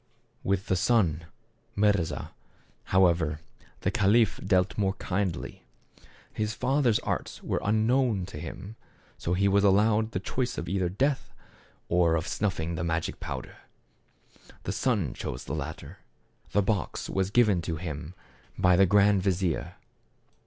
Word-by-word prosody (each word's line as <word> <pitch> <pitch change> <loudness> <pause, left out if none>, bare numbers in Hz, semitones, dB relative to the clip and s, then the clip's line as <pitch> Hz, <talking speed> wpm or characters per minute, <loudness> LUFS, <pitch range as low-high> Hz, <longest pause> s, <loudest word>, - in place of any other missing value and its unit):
With 95 0 0
the 95 - +1
son, 90 -6 +2 0.5
Mirza, 100 -5 +1 0.5
however, 85 -5 +2 0.4
the - - 0
caliph 105 +2 +3
dealt 95 0 +2
more 95 -2 +1
kindly. 95 -2 -3 0.7
His 110 0 -2
father's 130 -3 +2
arts - - -4
were - - -1
unknown 110 -1 +2
to 95 - -8
hjm, 95 +5 -7 0.5
so 85 - -1
he 100 +2 +2
was 100 +1 +3
allowed 105 +2 +3
the 95 - -3
choice 125 +6 -2
either 90 +2 -1
of 90 +3 -8
death, 140 0 0 0.5
or 85 -1 +3
of 80 +1 -2
snuffing 90 -5 -1
the 85 +1 -3
magic 85 -1 -2
powder. - - -6 1.1
The - - -2
son 105 - 0
chose - - -5
the - - -6
latter. 75 0 -6 0.5
The 105 - +2
box 100 -2 -2
was 95 -1 -1
given 105 -5 +3
him 80 0 -5 0.4
by 90 -1 +4
the 95 +2 +5
grand 100 0 +4
vizier. 90 -3 -1
95 Hz, 135 wpm, -28 LUFS, 85-105 Hz, 1.1 s, the